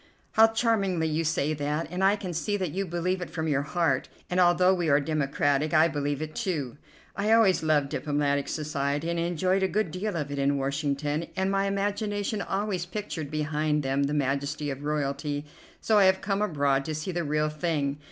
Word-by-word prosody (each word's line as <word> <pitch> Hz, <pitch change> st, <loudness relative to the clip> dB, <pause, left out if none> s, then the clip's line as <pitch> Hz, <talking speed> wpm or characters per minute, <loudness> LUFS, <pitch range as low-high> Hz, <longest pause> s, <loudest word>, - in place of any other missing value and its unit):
"How 225 Hz, +1 st, +7 dB
charmingly 215 Hz, -7 st, +1 dB
you 160 Hz, +1 st, 0 dB
say 155 Hz, -1 st, 0 dB
that, 150 Hz, +2 st, -2 dB
and 180 Hz, +1 st, -2 dB
I 195 Hz, +2 st, +5 dB
can 185 Hz, -4 st, -5 dB
see 205 Hz, +5 st, -1 dB
that 185 Hz, -5 st, -2 dB
you 195 Hz, +3 st, -2 dB
believe 180 Hz, +2 st, -1 dB
it 180 Hz, -, -5 dB
from 160 Hz, -1 st, -3 dB
your 140 Hz, -2 st, +1 dB
heart; 150 Hz, -3 st, 0 dB, 0.2 s
and 180 Hz, -, +1 dB
although 180 Hz, +1 st, +5 dB
we 175 Hz, -4 st, 0 dB
are 140 Hz, 0 st, +5 dB
democratic, 145 Hz, 0 st, 0 dB
I 160 Hz, +1 st, +6 dB
believe 145 Hz, -2 st, -2 dB
it, 155 Hz, 0 st, -7 dB
too. 155 Hz, -, -3 dB, 0.4 s
I 205 Hz, +2 st, 0 dB
always 225 Hz, -5 st, +5 dB
love 155 Hz, -3 st, +2 dB
diplomatic 145 Hz, 0 st, -1 dB
society, 145 Hz, +1 st, -2 dB
and 170 Hz, -, -1 dB
enjoyed 180 Hz, +3 st, +1 dB
a 190 Hz, -, +3 dB
good 210 Hz, -3 st, -1 dB
deal 195 Hz, +3 st, -3 dB
of 145 Hz, -3 st, -3 dB
it 140 Hz, -, -3 dB
in 140 Hz, +1 st, +2 dB
Washington, 145 Hz, +3 st, -1 dB
and 190 Hz, 0 st, 0 dB
my 195 Hz, 0 st, +1 dB
imagination 205 Hz, +1 st, -1 dB
always 195 Hz, -3 st, -2 dB
pictured 180 Hz, -7 st, -5 dB
behind 150 Hz, 0 st, 0 dB
them 135 Hz, +1 st, 0 dB
the 145 Hz, -, -2 dB
majesty 140 Hz, +1 st, -1 dB
of 135 Hz, +1 st, -7 dB
royalty, 145 Hz, 0 st, -2 dB, 0.4 s
so 215 Hz, -2 st, +3 dB
I 195 Hz, -, +6 dB
have 190 Hz, 0 st, +4 dB
come 195 Hz, 0 st, -1 dB
abroad 140 Hz, -8 st, +1 dB
to 155 Hz, -, -3 dB
see 155 Hz, +5 st, -3 dB
the 175 Hz, -1 st, -2 dB
real 150 Hz, 0 st, 0 dB
thing. 150 Hz, -3 st, -1 dB
155 Hz, 200 wpm, -27 LUFS, 145-190 Hz, 0.4 s, How